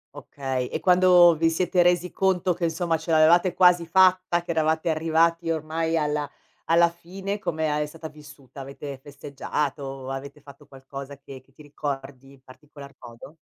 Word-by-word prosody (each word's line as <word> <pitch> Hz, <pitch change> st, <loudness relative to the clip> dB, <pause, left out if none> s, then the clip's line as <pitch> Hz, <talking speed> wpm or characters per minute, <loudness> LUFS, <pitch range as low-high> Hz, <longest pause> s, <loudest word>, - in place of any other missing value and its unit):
Okay. 130 Hz, -3 st, -4 dB
E -, -, -5 dB
quando 180 Hz, -2 st, +5 dB
vi 165 Hz, 0 st, +2 dB
siete 180 Hz, +2 st, +1 dB
resi 175 Hz, 0 st, +2 dB
conto 185 Hz, -2 st, 0 dB
che 170 Hz, 0 st, -3 dB
insomma 165 Hz, 0 st, -1 dB
ce 160 Hz, +1 st, -6 dB
l'avevate 170 Hz, +3 st, +4 dB
quasi 180 Hz, -2 st, +4 dB
fatta, 185 Hz, -1 st, +3 dB
che 170 Hz, -, -5 dB
eravate 160 Hz, +1 st, 0 dB
arrivati 165 Hz, +1 st, +1 dB
ormai 160 Hz, +1 st, -2 dB
alla 150 Hz, -1 st, -2 dB, 0.4 s
alla 170 Hz, +1 st, +4 dB
fine, 190 Hz, +4 st, -6 dB
come 160 Hz, -6 st, -2 dB
a 150 Hz, -, -1 dB
è 150 Hz, -, -1 dB
stata 160 Hz, +1 st, -9 dB
vissuta? 145 Hz, -3 st, -15 dB
Avete 140 Hz, 0 st, -8 dB
festeggiato? 140 Hz, -1 st, -5 dB
Avete 140 Hz, +2 st, -7 dB
fatto 140 Hz, 0 st, -16 dB
qualcosa 135 Hz, +1 st, -10 dB
che 135 Hz, -1 st, -12 dB
che 130 Hz, 0 st, -31 dB
ti 150 Hz, -, -17 dB
ricordi 140 Hz, -2 st, -7 dB
in 135 Hz, -, -21 dB
particolar 140 Hz, +1 st, -14 dB
modo? 120 Hz, +5 st, -13 dB
155 Hz, 165 wpm, -24 LUFS, 140-170 Hz, 0.4 s, quando